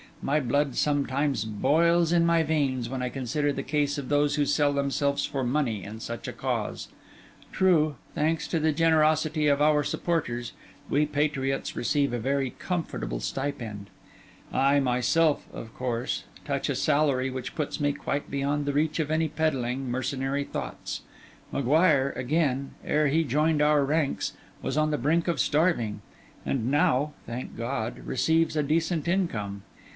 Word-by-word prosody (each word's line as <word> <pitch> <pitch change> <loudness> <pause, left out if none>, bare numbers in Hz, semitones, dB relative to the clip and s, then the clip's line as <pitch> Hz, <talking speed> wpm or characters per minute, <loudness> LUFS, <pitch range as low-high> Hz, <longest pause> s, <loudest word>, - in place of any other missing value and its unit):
My 145 +3 +2
blood 140 +1 0
sometimes 140 -4 +1
boils 165 +10 +2
in 170 -1 +4
my 170 -1 +4
veins, 135 -6 0
when 130 0 -3
I 125 - -1
consider 140 +3 -1
the 135 - -4
case 145 +1 0
of 135 - -6
those 145 0 +2
who 145 -1 +2
sell 145 0 +2
themselves 140 0 0
for 135 -2 -3
money 120 -5 0
in 110 +2 -8
such 115 -1 -6
a - - -4
cause. - - -3 0.6
True, 160 -6 +3 0.2
thanks 160 +2 0
to 165 - +1
the 155 0 +2
generosity 155 -1 +3
of 145 0 +3
our 150 0 +4
supporters, 125 -11 -2 0.4
we 150 +1 +2
patriots 145 -2 -1
receive 140 +1 +1
a 120 - -1
very 135 +2 0
comfortable 105 - -3
stipend; 105 - -4 0.6
I 140 +1 +4
myself, 135 +5 +2
of 110 - -8
course, 125 -2 -2 0.2
touch - - -1
a - - 0
salary 140 -3 +2
which 130 -1 -5
puts 150 -3 -3
me 145 -1 +2
quite 145 0 -3
beyond 140 +1 -1
the 145 - -1
reach 150 +2 +1
of 155 -2 0
any 160 +1 +1
peddling, 135 -5 -1
mercenary 135 +2 -1
thoughts; - - -5 0.5
M'Guire, 140 0 +3
again, 140 -1 0
ere 150 0 +2
he 160 +4 +2
joined 150 +2 +1
our 150 -1 +4
ranks, 150 0 0 0.3
was 135 +2 -2
on 155 0 +2
the 150 - 0
brink 160 +7 +1
of 170 - 0
starving, 150 -9 +1 0.4
and 125 -3 -1
now, 145 +1 +2
thank 120 +2 -6
God! 115 -1 -3
receives 160 +4 +1
a 150 - +2
decent 160 +2 0
income. 110 - -1
145 Hz, 155 wpm, -27 LUFS, 130-155 Hz, 0.6 s, in